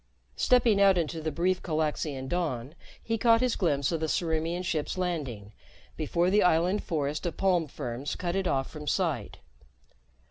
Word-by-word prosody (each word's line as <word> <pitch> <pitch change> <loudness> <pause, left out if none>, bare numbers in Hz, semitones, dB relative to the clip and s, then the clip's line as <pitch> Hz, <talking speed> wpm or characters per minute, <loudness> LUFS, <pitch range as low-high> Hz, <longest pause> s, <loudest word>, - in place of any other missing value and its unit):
Stepping 235 -5 +3
out 195 -2 +6
into 165 -1 -2
the 155 0 -2
brief 180 +4 0
Calaxian 155 -4 -2
dawn, 150 -6 -2 0.3
he 225 -1 -1
caught 230 -1 +5
his 250 -1 +1
glimpse 145 -6 +1
of 165 - -1
the 160 - -1
Ciriimian 165 +2 -1
ship's 160 -1 -2
landing 135 - -3 0.4
before 175 +2 0
the 210 +1 +4
island 180 +4 +3
forest 150 -2 -2
of 170 - -5
palm 180 -4 +2
ferns 130 +1 -5
cut 175 0 -3
it 195 -1 0
off 135 -4 0
from 150 -1 -9
sight. - - -1
165 Hz, 165 wpm, -28 LUFS, 150-185 Hz, 0.4 s, out